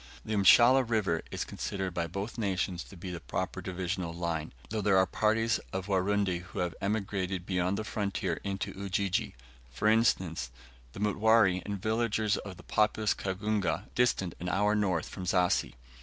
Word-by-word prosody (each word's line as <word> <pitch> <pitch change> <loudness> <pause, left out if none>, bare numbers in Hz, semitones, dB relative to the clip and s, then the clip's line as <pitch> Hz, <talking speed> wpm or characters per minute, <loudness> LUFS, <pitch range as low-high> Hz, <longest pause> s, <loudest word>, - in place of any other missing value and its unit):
The 110 - -3
Mshala 120 +6 +7
River 110 -8 0
is - - -3
considered 95 -3 -4
by 85 -1 -1
both 100 +7 -5
nations 95 -4 -1
to 95 - -13
be 90 +1 -6
the 85 - -5
proper - - -3
divisional 90 -1 -3
line; 85 -2 -2 0.2
though 110 -1 -1
there 100 -1 +3
are 95 - +5
parties 110 +4 +1
of 95 -1 -3
Warundi 95 -1 +1
who 90 - -12
have 90 -1 -1
emigrated 95 -3 -2
beyond 90 +1 0
the - - -2
frontier 100 -5 -2
into 100 -1 -3
Ujiji; 100 0 -1 0.3
for 65 +11 -1
instance, 95 - +2 0.4
the - - -9
Mutware 105 -2 +3
and 100 -1 -4
villagers 110 0 +1
of 95 -3 -7
populous 105 0 +2
Kagunga, 100 0 -2
distant 110 -8 +1
an 90 - -3
hour 105 +3 +2
north 95 -6 0
from 90 - -7
Zassi. 90 -6 +1
95 Hz, 160 wpm, -30 LUFS, 90-105 Hz, 0.4 s, Mshala